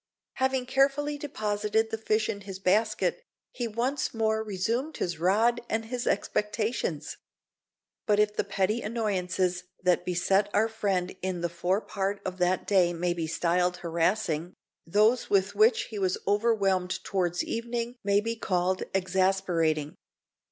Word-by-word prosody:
Having 260 -1 +1
carefully 280 +3 +1
deposited 215 -4 -1
the 225 - -1
fish 215 0 +1
in 200 - -4
his 195 -1 -7
basket, 205 - +1 0.3
he 240 -2 -3
once 245 +4 -1
more 220 -1 +1
resumed 225 +9 -2
his 170 -3 -2
rod 220 +7 +3
and 225 0 -1
his 245 +2 -4
expectations. 210 - -1 0.9
But 210 -1 +3
if 210 0 +2
the - - +1
petty 200 +3 0
annoyances 185 -5 -1 0.2
that 180 -1 +3
beset 190 +3 +1
our 215 +2 +4
friend 195 -5 -1
in 185 -2 -2
the 175 - 0
fore 180 +4 0
part 200 -1 -2
of 185 0 -4
that 180 +1 +1
day 180 -4 +3
may 175 +1 0
be 165 -2 -3
styled 180 +2 +1
harassing, 170 0 0 0.3
those 215 +7 +3
with 195 0 +2
which 220 +3 +4
he 210 - -4
was 185 -1 +1
overwhelmed 200 -4 +1
towards 175 -3 0
evening 235 +1 -3
may 200 0 +3
be 230 +1 -2
called 185 -3 0
exasperating. 185 -5 +1
200 Hz, 145 wpm, -28 LUFS, 180-225 Hz, 0.9 s, our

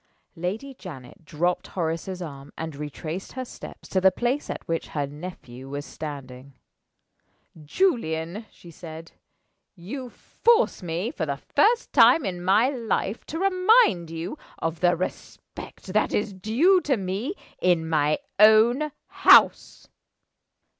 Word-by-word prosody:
Lady 205 +11 -4
Janet 155 - -11
dropped 175 +4 -1
Horace's 175 +2 -3
arm, 140 -3 -9
and 160 -2 -5
retraced 155 +5 -6
her 260 0 -5
steps - - -11
to 190 - +1
the 190 - +7
place 245 +9 -2
at - - -6
which 165 0 -2
her 145 -2 -2
nephew 140 -4 -10
was 145 +1 -5
standing. 140 -3 -8 1.1
"Julian," 185 - -1
she 170 - -15
said. 165 0 -10 0.6
"You 245 +9 -7
force 465 - +1
me, 175 +6 -3
for 160 - -4
the 140 -1 -2
first 425 - +1
time 250 +3 +6
in 180 -2 -4
my 210 +8 +4
life, 230 -4 -2
to 320 - -5
remind 370 - +3
you 165 - -6 0.2
of 165 0 -3
the 175 -1 +3
respect 185 +2 -8
that 215 - +1
is 205 -1 -1
due 250 - +3
to 275 -6 0
me 200 - -3 0.3
in 175 -3 +2
my 155 -1 +2 0.2
own 230 +8 +5
house. - - +4
180 Hz, 135 wpm, -25 LUFS, 160-240 Hz, 1.1 s, the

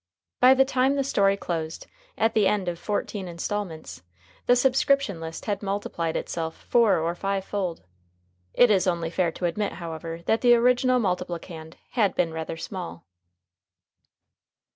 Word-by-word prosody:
By 255 +1 +7
the 265 0 +5
time 265 +1 +2
the 275 - +1
story 200 -7 +2
closed, 165 -4 -4 0.3
at 225 0 +2
the 210 -3 +3
end 200 -3 0
of 170 -1 -3
fourteen 205 -1 -3
instalments, 170 - -5 0.5
the 245 - +6
subscription 265 -5 +2
list 160 0 -7
had 205 -2 -2
multiplied 195 -5 -2
itself 165 -1 -5
four 230 -4 +4
or 165 +1 -1
five 195 +2 -2
fold. 185 -5 -3 0.7
It 245 -2 +6
is 190 -2 +3
only 170 -2 -1
fair 175 -1 +1
to 180 - -4
admit, 200 +4 -1
however, 165 0 -7
that 225 - +1
the 240 -1 +6
original 250 +1 +3
multiplicand 175 -5 -4 0.2
had 210 -6 +1
been 165 -2 0
rather 160 0 -5
small. 175 - -7
190 Hz, 150 wpm, -25 LUFS, 165-225 Hz, 0.7 s, By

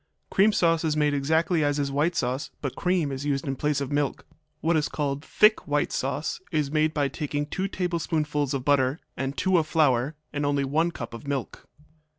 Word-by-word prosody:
Cream 205 +3 +5
sauce 165 -4 +2
is 155 -2 0
made 150 -1 +2
exactly 160 +4 +2
as 145 0 +1
is 140 -1 -1
white 155 +5 +1
sauce, 130 +3 -1
but 135 -3 -4
cream 180 -5 0
is 135 +1 -4
used 140 -2 -1
in 135 - -1
place 150 +1 0
of 140 -1 -4
milk. 145 -1 -1 0.3
What 165 +1 +1
is 155 -2 +1
called 145 -1 -2
thick 215 +5 +3
white 145 0 +1
sauce 135 +3 -2
is 150 -3 0
made 155 0 +2
by 145 -3 +1
taking 145 +1 -3
two 190 +6 -2
tablespoonfuls 155 -6 -1
of 130 -1 -4
butter 140 +1 +2 0.2
and 135 +1 -3
two 185 -2 +3
of 155 - -2
flour, 145 -2 +2 0.2
and 145 - -2
only 145 -1 +1
one 155 +5 +1
cup 120 -9 -7
of 115 +5 -9
milk. 140 -4 -4
145 Hz, 200 wpm, -26 LUFS, 140-160 Hz, 0.3 s, Cream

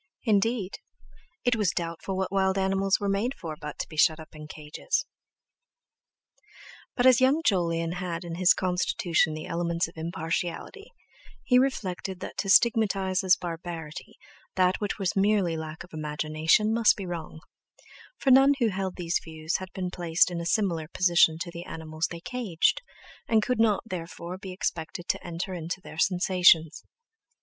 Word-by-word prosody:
Indeed, 215 -2 0 0.7
it 245 -1 +3
was 210 -5 +1
doubtful 170 +3 -4
what 190 -1 -2
wild 190 -1 +1
animals 195 0 +1
were 205 - -2
made 205 +7 0
for 160 -3 -6
but 150 -2 -8
to - - -4
be 155 - -12
shut 155 +1 +4
up 160 - -11
in 150 -1 -10
cages! 150 - -3 1.9
But 245 - +1
as 255 0 +6
young 275 +5 +3
Jolyon 165 -4 +1
had 175 -1 -4
in 170 -1 -6
his 180 +1 +4
constitution 180 -3 0
the 155 - -6
elements 170 0 -1
of 165 - -16
impartiality, 170 - -4 0.5
he 250 -1 +4
reflected 190 -8 -2
that - - -7
to 195 - -2
stigmatize 195 -3 +3
as 190 0 +5
barbarity 165 -2 -7 0.4
that 185 +1 +2
which 205 - -2
was 195 -4 -1
merely 195 -4 +2
lack 160 0 -6
of 180 - -18
imagination 155 +7 +1
must 230 -1 +4
be 195 - -6
wrong; 170 -3 -6 0.8
for 270 - +2
none 270 +2 +7
who 235 -5 +2
held 190 -1 -3
these 175 -1 -1
views 160 +1 -3
had 185 -1 -9
been 180 0 -4
placed 175 0 +2
in 170 -1 -3
a 170 - -4
similar 175 -7 0
position 170 -2 +3
to 170 - -4
the 170 +1 -8
animals 160 0 -4
they 170 -1 -8
caged, 215 -8 0 0.5
and 220 -2 +3
could 250 +1 -1
not, 215 -3 +3
therefore, 175 -1 -6
be 190 -1 -8
expected 175 -2 -4
to - - -1
enter 175 +2 -5
into 175 +2 -4
their 160 -3 -10
sensations. 175 -3 +3
180 Hz, 165 wpm, -27 LUFS, 165-195 Hz, 1.9 s, none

